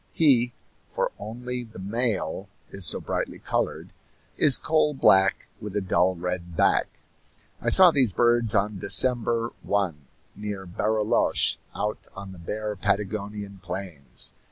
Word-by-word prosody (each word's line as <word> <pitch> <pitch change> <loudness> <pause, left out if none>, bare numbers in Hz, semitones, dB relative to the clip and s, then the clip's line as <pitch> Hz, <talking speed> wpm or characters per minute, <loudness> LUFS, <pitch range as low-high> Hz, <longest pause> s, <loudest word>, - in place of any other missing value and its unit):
He 125 -6 +3 0.3
for - - -2
only 125 +4 -6
the 110 -2 -14
male 100 -3 -3 0.2
is 100 -3 +1
so - - +1
brightly - - -4
colored - - -3 0.4
is 145 -4 +7
coal 155 -2 0
black 95 -6 +3
with 105 -1 -8
a - - +1
dull 95 -1 +1
red 90 -1 -5
back. - - +2 0.7
I - - 0
saw 185 -2 +8
these 130 -8 +2
birds 120 0 +2
on 100 0 0
December 115 +3 +4
1 85 -9 -2 0.3
near 105 -2 -6
Barilloche, 105 +4 +1 0.2
out 105 0 -4
on 95 0 -9
the 90 - -12
bare 105 +5 -5
Patagonian 100 0 -3
plains. 90 -7 -6
105 Hz, 130 wpm, -25 LUFS, 95-120 Hz, 0.7 s, saw